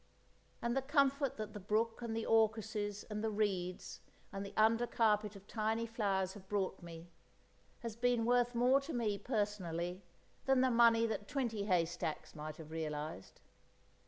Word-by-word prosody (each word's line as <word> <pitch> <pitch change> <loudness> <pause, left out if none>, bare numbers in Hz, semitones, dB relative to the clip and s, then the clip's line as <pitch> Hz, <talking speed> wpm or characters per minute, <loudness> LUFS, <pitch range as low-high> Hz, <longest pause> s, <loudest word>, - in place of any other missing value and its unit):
And 235 +1 0
the 270 - +2
comfort 275 -1 +2
that 215 -1 -5
the 210 - -6
brook 220 +4 0
and 230 -1 -3
the 225 - -2
orchises 215 -2 +1
and 210 0 -3
the 220 - +1
reeds 195 -4 -2 0.3
and 195 0 -3
the 200 - -7
under 225 +2 +4
carpet 210 -3 +2
of 195 0 -12
tiny 220 +1 -1
flowers 195 -5 -1
have 190 -2 -13
brought 195 -2 -1
me, 170 0 -10 0.7
has 230 -3 -5
been 240 -1 +2
worth 245 0 +3
more 255 +3 +4
to 290 +4 -6
me, 215 -4 0
personally, 185 -6 -2 0.4
than 265 -1 +4
the 260 0 +3
money 230 -1 +5
that 215 -2 -3
twenty 230 -7 -1
haystacks 175 -4 -1
might 155 0 -7
have 160 -1 -10
realised. 155 -7 -5
215 Hz, 160 wpm, -36 LUFS, 190-235 Hz, 0.7 s, money